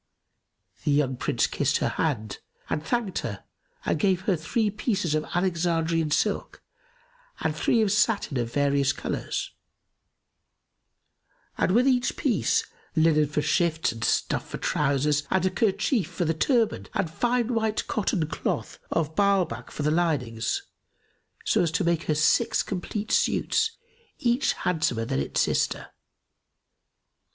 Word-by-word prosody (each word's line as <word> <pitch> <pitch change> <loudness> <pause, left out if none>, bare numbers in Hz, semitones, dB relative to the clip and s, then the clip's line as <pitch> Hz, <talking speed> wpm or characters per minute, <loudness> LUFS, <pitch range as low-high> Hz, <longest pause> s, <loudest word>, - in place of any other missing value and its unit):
The - - 0
young 140 -2 +2
Prince 125 -1 0
kissed 145 +1 +1
her - - 0
hand 110 -10 -2 0.3
and 150 - -1
thanked 225 0 -1
her - - -5 0.4
and - - 0
gave 190 -3 +2
her 190 0 +1
three 210 +7 0
pieces 200 - -1
of 155 0 +1
Alexandrian 165 -3 +1
silk - - -1 0.8
and - - 0
three 230 -2 +2
of 205 - +1
satin 210 - +1
of 120 -1 -2
various 140 0 +2
colours, - - -3 2.0
and - - +1
with 245 +4 +4
each 250 -2 +2
piece, - - +1 0.3
linen 155 -2 +4
for 150 0 -1
shifts 160 0 +1
and 115 0 -7
stuff - - 0
for - - -5
trousers 145 +1 +1
and 190 -1 +1
a 185 - +2
kerchief 215 +2 +1
for 175 - -3
the 160 - +1
turband 225 - +1
and 170 -5 0
fine 240 +4 0
white 220 -1 0
cotton 190 -6 0
cloth 160 - -3
of 160 -1 -1
Ba'albak 200 -4 +1
for 150 - -5
the 150 - +2
linings, 145 -9 0 0.8
so - - +3
as 170 - +2
to 180 - +1
make 170 -1 +1
her 155 - +1
six 185 +10 +3
complete 205 +3 -4
suits, 445 +1 +1 0.4
each 245 +2 +1
handsomer 155 -10 0
than 70 - -1
its 70 - 0
sister. - - 0
170 Hz, 140 wpm, -26 LUFS, 150-210 Hz, 2.0 s, with